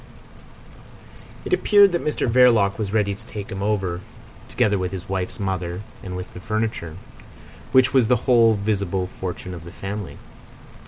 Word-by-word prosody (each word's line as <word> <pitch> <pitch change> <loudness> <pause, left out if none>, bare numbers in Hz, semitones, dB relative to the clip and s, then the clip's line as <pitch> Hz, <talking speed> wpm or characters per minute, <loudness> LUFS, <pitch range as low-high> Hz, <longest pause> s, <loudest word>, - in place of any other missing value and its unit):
It - - -2
appeared 205 - +5
that 175 - -1
Mr 150 - -1
Verloc 115 -5 +4
was 100 -3 -2
ready 105 -2 +1
to 110 +3 -12
take 105 -4 -7
him 95 0 -5
over 95 -4 -1 0.5
together 100 -2 +1
with 90 -1 -2
his 95 -2 -7
wife's 95 +4 -3
mother 95 -1 -3 0.2
and 90 -1 -6
with 90 0 -7
the - - -8
furniture, 110 -5 -3 0.7
which 130 -1 +4
was 130 -4 +4
the 125 - +4
whole 115 -3 +5
visible 100 -3 -1
fortune 90 0 -6
of 85 -2 -8
the 85 - -10
family. 100 0 -6
100 Hz, 160 wpm, -22 LUFS, 95-115 Hz, 0.7 s, appeared